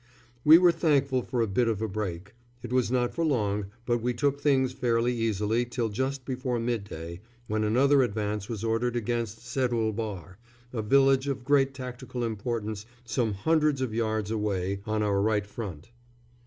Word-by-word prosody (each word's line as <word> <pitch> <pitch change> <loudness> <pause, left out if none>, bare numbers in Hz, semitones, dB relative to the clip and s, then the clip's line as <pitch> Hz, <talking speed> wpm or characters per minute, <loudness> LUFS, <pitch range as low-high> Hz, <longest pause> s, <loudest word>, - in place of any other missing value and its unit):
We 155 +2 +9
were 175 0 +6
thankful 140 -6 +2
for 120 0 -2
a 115 - +2
bit 115 +5 +1
of 110 -3 0
a 110 - -1
break. 95 -2 -4 0.3
It 120 0 -5
was 125 -2 +2
not 125 -1 +1
for 170 - -1
long, 105 -9 0 0.2
but 120 -1 +1
we 120 +1 -1
took 140 +2 0
things 130 -3 +2
fairly 120 -1 +1
easily 110 0 0
till 120 -1 -2
just 130 +4 -2
before 130 -2 -2
midday, 100 -8 -4 0.3
when 110 -1 -1
another 135 +6 +4
advance 105 -3 -2
was 110 -2 -4
ordered 115 +2 0
against 115 -1 -2
Seddul 120 -3 0
Bahr, 100 -4 -5 0.3
a 115 - -1
village 135 +4 +4
of 135 -3 -3
great 135 -1 +3
tactical 125 -1 -5
importance 110 -1 -3 0.2
some 120 -3 0
hundreds 155 +4 +2
of 130 -4 -2
yards 110 -2 -1
away, 100 -3 -1
on 110 0 0
our 100 -1 +1
right 105 -1 +1
front. 100 -4 -7
115 Hz, 170 wpm, -28 LUFS, 105-130 Hz, 0.3 s, We